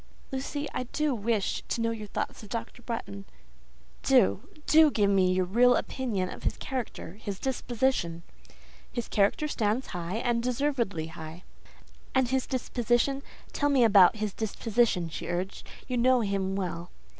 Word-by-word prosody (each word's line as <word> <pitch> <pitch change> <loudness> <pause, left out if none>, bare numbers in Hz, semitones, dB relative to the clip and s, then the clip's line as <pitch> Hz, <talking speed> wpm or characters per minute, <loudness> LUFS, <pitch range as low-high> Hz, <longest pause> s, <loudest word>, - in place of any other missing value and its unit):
"Lucy, 285 +2 -3
I 255 - -2
do 300 +3 0
wish 220 -2 0
to - - -2
know 230 0 +1
your 215 -2 -6
thoughts - - -4
of 210 - -12
Dr. 230 +2 -5
Bretton. 100 - -5 0.8
Do, 95 +9 +3 0.2
do 315 0 +7
give 205 -7 +2
me 185 -2 +4
your 185 0 +2
real 245 +7 +5
opinion 220 -8 -1
of - - -9
his - - -1
character, 225 -7 -5
his 200 -3 -4
disposition." 240 -8 -1 0.7
"His 240 -2 -3
character 205 +9 +2
stands 225 -2 0
high, 175 +1 -3
and 235 0 0
deservedly 245 - 0
high." 160 +1 -9 0.7
"And 260 -2 +3
his 265 0 0
disposition? 245 +1 0 0.3
Tell 290 - +1
me 270 -4 +4
about 200 -5 +7
his 210 -2 -3
disposition," 220 -3 +1
she 160 - -6
urged; 180 +3 -3 0.2
"you 250 - -1
know 250 +1 +4
him 195 -2 -1
well." 175 -2 -3
225 Hz, 155 wpm, -28 LUFS, 190-250 Hz, 0.8 s, do